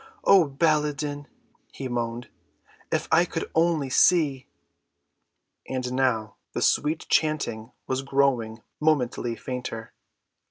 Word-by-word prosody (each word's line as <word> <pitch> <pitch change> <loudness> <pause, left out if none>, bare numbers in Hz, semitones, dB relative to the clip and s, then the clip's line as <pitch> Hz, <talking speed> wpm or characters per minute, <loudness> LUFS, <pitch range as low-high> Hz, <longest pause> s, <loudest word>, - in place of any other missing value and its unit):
"Oh, 185 -5 +6
Baladan," 150 -1 0 0.4
he 135 - -6
moaned, 120 -1 -3 0.6
"if - - 0
I 160 +2 +6
could 165 -2 -4
only 160 -5 +1
see!" 145 -5 +3 1.2
And 125 -1 -3
now 120 -5 0 0.2
the - - -2
sweet 155 +2 +1
chanting 125 -8 0
was 130 0 -1
growing 130 -5 0 0.2
momently 125 -6 +1
fainter. 115 -1 -6
135 Hz, 105 wpm, -25 LUFS, 120-155 Hz, 1.2 s, Oh